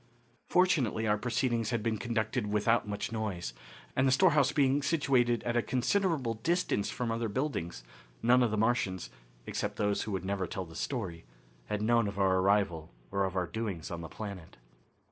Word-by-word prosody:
Fortunately 150 - +2
our 105 0 +2
proceedings 120 -1 0
had 120 -3 -1
been 110 -2 0
conducted 110 +1 -1
without 105 +2 +2
much 105 +1 -3
noise, 100 - -3 0.4
and 130 +1 +3
the - - +4
storehouse 150 -3 +4
being 140 -1 +3
situated 130 -6 +2
at 120 - -1
a 120 - +4
considerable 135 - +1
distance 160 - 0
from 120 -2 -2
other 115 0 -1
buildings, 100 - -3 0.4
none 125 +2 +5
of 120 - +3
the 110 - -1
Martians, 105 -5 0 0.3
except - - -3
those 105 -1 0
who 110 - -4
would 95 -2 -3
never 95 -1 -1
tell 95 - -4
the 80 - -13
story, 95 -11 -3 0.4
had 105 0 -2
known 115 -1 +3
of 100 -1 -5
our 95 -1 +3
arrival 95 -5 +1 0.2
or 100 0 +1
of 95 -1 -4
our 90 -1 +1
doings 95 -3 -4
on 85 -1 -4
the 80 - -7
planet. 100 -6 -8
110 Hz, 180 wpm, -31 LUFS, 100-125 Hz, 0.4 s, none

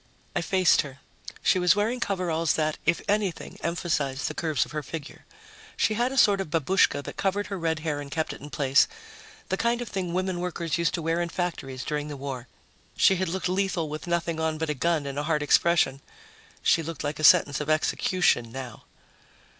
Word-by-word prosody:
I - - +1
faced 185 -4 +4
her. 140 -2 -10 0.5
She 185 - +4
was 180 0 +4
wearing 220 +5 0
coveralls 175 -6 0
that, 155 -1 -1
if 170 - +2
anything, 205 -4 -1
emphasized 155 -5 -1
the - - -3
curves 155 -4 0
of - - -14
her 150 0 -3
figure. 150 +1 -8 0.5
She 215 - +2
had 240 +4 0
a 270 - -4
sort 200 -5 +5
of 190 - -5
babushka 160 -1 +2
that - - -8
covered 200 +1 0
her 195 - -3
red 160 -1 -1
hair 150 -2 -2
and 145 - -8
kept 160 +2 -2
it - - -12
in 145 - -9
place 135 0 +3 0.6
the 190 - 0
kind 235 +2 +1
of 245 - -5
thing 185 -3 -3
women 185 0 -1
workers 170 -2 -2
used 170 0 +1
to 170 - -4
wear 165 +2 0
in 170 - -2
factories 140 -8 -4
during 150 -1 -2
the 145 -1 -6
war. 135 -2 -6 0.5
She 190 - +5
had 185 -1 -1
looked 185 +1 -2
lethal 185 -3 0
with 155 +3 -6
nothing 170 -1 -1
on 160 -1 0
but 160 -1 -1
a - - 0
gun 155 +1 0
and 140 0 -4
a - - -2
hard 150 -2 +1
expression. 145 -3 +3 0.6
She 165 - +4
looked 165 -2 -6
like 145 +1 -3
a - - -4
sentence 145 -1 +6
of 150 - -4
execution 155 -5 +2
now. 130 -2 -8
165 Hz, 210 wpm, -26 LUFS, 150-185 Hz, 0.6 s, sentence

